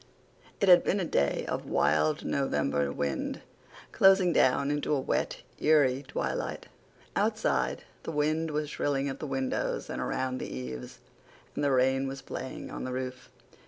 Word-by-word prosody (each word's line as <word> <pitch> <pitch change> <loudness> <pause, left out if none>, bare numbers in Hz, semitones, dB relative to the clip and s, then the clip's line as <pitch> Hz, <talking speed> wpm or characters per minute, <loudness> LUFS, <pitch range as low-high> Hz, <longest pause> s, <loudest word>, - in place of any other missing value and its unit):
It 200 - +2
had 180 -1 +8
been 200 - +1
a 185 - 0
day 70 - +1
of - - -3
wild 75 - +2
November 70 - 0
wind, 70 -1 -2 0.5
closing 190 -2 +5
down 140 +1 +3
into 145 0 -1
a - - +1
wet, 130 - -1 0.2
eerie 140 -3 +3
twilight. - - -3 0.5
Outside, - - 0 0.2
the - - -5
wind 155 +2 0
was 150 0 -1
shrilling 140 -1 0
at 135 - -6
the 155 - -4
windows 135 -1 -2
and - - -3
around 130 0 -2
the - - -5
eaves, 65 0 -7 0.5
and - - -2
the 145 - +3
rain 130 +1 +3
was 135 0 -6
playing 130 - -6
on - - -5
the 130 - -3
roof. 130 0 -5
135 Hz, 160 wpm, -29 LUFS, 130-150 Hz, 0.5 s, had